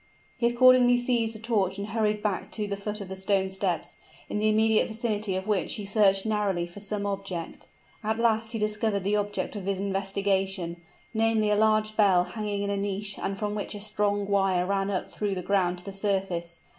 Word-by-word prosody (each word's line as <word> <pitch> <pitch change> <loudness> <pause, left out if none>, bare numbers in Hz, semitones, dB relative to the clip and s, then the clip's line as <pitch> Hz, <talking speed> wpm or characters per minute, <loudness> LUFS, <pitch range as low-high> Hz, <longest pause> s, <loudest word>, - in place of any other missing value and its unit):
He 235 - +2
accordingly 245 0 +6
seized 240 -2 0
a - - -8
torch 205 -4 0
and 200 +1 -5
hurried 210 -1 0
back 205 -3 -2
to 210 -2 -1
the 200 - -2
foot 210 +1 -5
of 200 - -6
the 190 - -6
stone 190 0 0
steps; 190 -3 -2 0.3
in 210 - -2
the 215 +1 +2
immediate 220 0 +3
vicinity 215 -3 -1
of 190 0 -3
which 210 -3 +1
he 210 - -5
searched 195 -1 +3
narrowly 205 -5 0
for 175 +3 -11
some 205 0 -4
object. 195 -4 -5 0.4
At 220 +1 0
last 225 -1 +1
he - - -1
discovered 210 -1 0
the 200 +2 +1
object 205 +1 -2
of 200 -3 -5
his 195 -1 0
investigation 195 -2 -1 0.3
namely 220 -1 +2
a - - +4
large 215 0 +2
bell 195 -5 +5
hanging 205 0 -3
in 200 - -1
a 200 - -1
niche, 200 0 -3
and 195 - -2
from 210 0 -2
which 210 0 -4
a - - -6
strong 205 -1 0
wire 195 -3 +2
ran 195 +1 0
up 190 -3 -2
through 205 -2 -3
the 180 - -4
ground 185 -2 +1
to 180 - -13
the 195 - -6
surface. 190 -4 -2
205 Hz, 205 wpm, -27 LUFS, 195-215 Hz, 0.4 s, accordingly